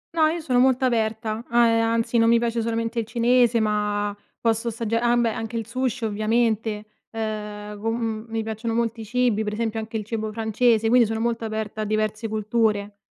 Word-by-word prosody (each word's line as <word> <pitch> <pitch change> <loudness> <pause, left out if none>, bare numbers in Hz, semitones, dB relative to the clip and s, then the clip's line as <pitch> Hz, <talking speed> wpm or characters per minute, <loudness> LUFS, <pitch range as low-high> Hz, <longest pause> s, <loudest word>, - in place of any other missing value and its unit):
No, 315 -1 +5
io 330 +2 -1
sono 255 -6 +1
molto 260 +1 +3
aperta, 220 -2 -1
uhm, 235 - 0 0.2
anzi 230 +1 +1
non 230 0 +4
mi 235 0 +5
piace 235 0 -1
solamente 230 +1 -1
il 225 - -2
cinese 240 +1 +3
ma 210 -1 0 0.2
posso 230 0 0
assagg 230 0 -4
ah 240 +1 +3
beh, 235 -1 +2
anche 225 0 -4
il 225 -2 -4
sushi 250 -1 -2
ovviamente. 215 0 0 0.3
Ehm, 210 -2 -5
con 225 +1 0
mhmm, 225 -2 -3
mi 225 0 -2
piacciono 220 +1 -3
molti 230 -1 -1
cibi, 230 -1 +1
pre 210 - -2
esempio 225 0 -2
anche 220 +1 -4
il 215 - -5
cibo 220 0 -3
francese, 225 +1 +2
quindi 240 +1 +5
sono 220 +1 -2
molto 230 0 -1
aperta 220 -1 -4
a - - 0
diverse 215 +1 -1
culture, 215 -1 0
225 Hz, 190 wpm, -24 LUFS, 215-235 Hz, 0.3 s, No